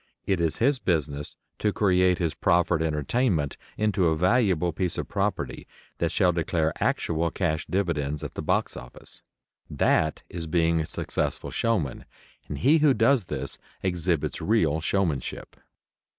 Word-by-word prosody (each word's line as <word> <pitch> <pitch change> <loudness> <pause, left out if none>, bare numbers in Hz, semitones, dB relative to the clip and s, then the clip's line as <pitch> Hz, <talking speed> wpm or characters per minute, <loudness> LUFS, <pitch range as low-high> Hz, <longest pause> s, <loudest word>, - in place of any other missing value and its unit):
It 95 -3 +1
is 80 -2 +1
his 135 +3 +2
business 75 - -1 0.2
to 105 - +1
create 90 -3 +3
his 85 -3 -1
proffered 85 -3 +2
entertainment 80 - 0 0.2
into 105 -4 +2
a 80 -1 +1
valuable 90 -3 +2
piece 90 +2 -2
of - - -3
property 100 0 -2 0.3
that - - 0
shall 90 - +3
declare 80 -2 0
actual 85 0 0
cash 80 -2 -1
dividends 75 -6 -1
at 75 - -5
the - - -4
box - - 0
office. 60 0 -10 0.5
That 80 0 +1
is 85 -2 -6
being 85 0 +2
a 75 - -4
successful - - -2
showman, 105 - -1 0.4
and 75 - -5
he 150 - +4
who 145 -3 +4
does 115 -1 +3
this 70 -4 -5 0.2
exhibits 90 -3 -1
real 80 -8 +2
showmanship. 80 -6 -2
85 Hz, 145 wpm, -26 LUFS, 80-100 Hz, 0.5 s, he